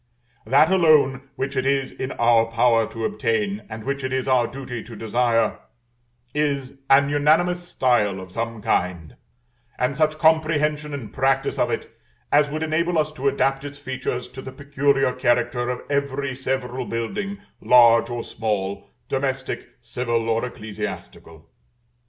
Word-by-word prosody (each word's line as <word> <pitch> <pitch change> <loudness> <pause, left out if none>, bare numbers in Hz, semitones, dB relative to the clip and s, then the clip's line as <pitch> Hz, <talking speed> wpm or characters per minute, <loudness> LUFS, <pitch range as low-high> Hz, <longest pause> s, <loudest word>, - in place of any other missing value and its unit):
That 150 +6 +5
alone 150 -7 +3
which 140 +1 -3
it 130 - +1
is 135 0 0
in 130 - -5
our 115 -1 +3
power 115 -1 +3
to 115 -1 -4
obtain, 105 -4 -1
and 110 0 -7
which 140 +2 -3
it 130 - -2
is 130 0 -1
our 125 -3 +3
duty 125 -3 -7
to 115 - -11
desire, 115 0 +1 0.7
is 140 -3 -1
an 140 +1 +5
unanimous 160 +5 +2
style 110 - +1
of 95 -1 -10
some 115 +1 -4
kind, 85 -4 -1 0.6
and 125 +2 0
such 155 +1 +1
comprehension 155 -2 +2
and 125 -6 -8
practice 135 +1 +1
of - - +2
it - - -4 0.4
as 145 0 +4
would 155 +2 -3
enable 165 +2 0
us 155 0 +1
to 140 -2 -3
adapt 135 0 +1
its 145 0 -7
features 130 -2 -4
to 130 - -9
the 130 - -8
peculiar 140 -1 +1
character 120 -1 +1
of 125 - -3
every 140 -1 -1
several 130 -1 -3
building, 195 - -3 0.2
large 115 -1 +6
or 120 -1 -4
small, 100 -2 -3 0.2
domestic, 135 -1 -2
civil, 115 -1 -2
or 115 0 0
ecclesiastical. 105 -8 -7
130 Hz, 150 wpm, -23 LUFS, 115-140 Hz, 0.7 s, large